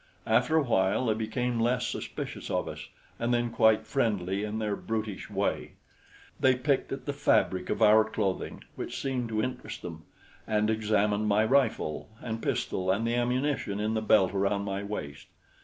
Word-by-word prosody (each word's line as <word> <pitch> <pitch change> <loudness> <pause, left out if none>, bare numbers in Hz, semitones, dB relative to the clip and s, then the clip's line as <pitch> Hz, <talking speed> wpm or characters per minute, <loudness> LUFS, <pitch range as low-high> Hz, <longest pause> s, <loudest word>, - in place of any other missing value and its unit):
After 160 - +3
a 155 - +4
while 105 -1 +2
they 110 - +3
became 115 +2 -2
less 120 +1 +1
suspicious - - -5
of - - -1
us - - -7 0.3
and 120 +1 0
then 120 -1 +1
quite 110 -1 +4
friendly 100 -7 0
in 105 +1 -3
their 105 -2 -1
brutish 110 -3 -4
way. - - -2 0.7
They 130 -1 +4
picked 135 +2 0
at 135 - -5
the 145 - -2
fabric 95 -9 +2
of - - +1
our 110 +1 +7
clothing, 105 -3 -3
which - - -5
seemed 130 -4 -2
to 110 -1 0
interest 130 -1 -5
them, 80 -3 -8 0.4
and 105 0 +2
examined 105 -1 +1
my 105 +1 +3
rifle 130 - +1
and 115 -1 -4
pistol 95 0 -1
and 100 +4 +1
the 115 - 0
ammunition 125 -3 0
in 105 +1 0
the 110 - 0
belt 105 -3 +4
around 100 +1 +1
my 100 0 -2
waist. 75 -9 -6
110 Hz, 175 wpm, -29 LUFS, 100-120 Hz, 0.7 s, our